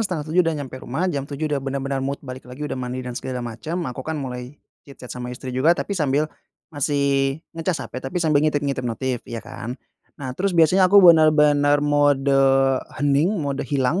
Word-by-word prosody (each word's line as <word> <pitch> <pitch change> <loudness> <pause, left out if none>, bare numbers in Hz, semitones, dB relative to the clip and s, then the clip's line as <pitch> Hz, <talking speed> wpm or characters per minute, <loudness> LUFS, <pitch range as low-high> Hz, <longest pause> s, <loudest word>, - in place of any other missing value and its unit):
6.30 165 -2 0
udah 165 -2 +1
nyampe 130 -3 -7
rumah, 140 +9 -3
jam 140 -1 -4
7.00 145 +2 -4
udah 145 -2 -1
bener-bener 135 0 -3
mood 135 +1 -2
balik 125 -1 -9
lagi, 130 +4 -7
udah 150 - -4
mandi 130 0 -4
dan 125 - -5
segala 125 0 -5
macam, 120 +8 -5
aku 125 0 -5
kan 160 +4 -4
mulai 125 -1 -6 0.2
chit-chat 135 -3 -11
sama 125 0 -6
istri 125 +1 -7
juga, 150 +7 +3
tapi 200 - -3
sambil 150 -5 +1 0.5
masih 140 -1 +1 0.2
ngecas 165 +1 -2
HP, 130 - -7
tapi 135 +5 -6
sambil 155 -4 +3
ngintip-ngintip 145 -3 0
notif, 125 0 -2
iya, 115 -1 -6
kan. 120 0 -7 0.4
Nah, 130 -3 -5
terus 180 +6 -1
biasanya 185 +3 +5
aku 200 0 +7
bener-bener 150 -3 +5
mode 145 -1 +3 0.6
hening, 145 +3 +2
mode 140 -4 -2
hilang 140 +4 0
140 Hz, 185 wpm, -22 LUFS, 130-155 Hz, 0.6 s, aku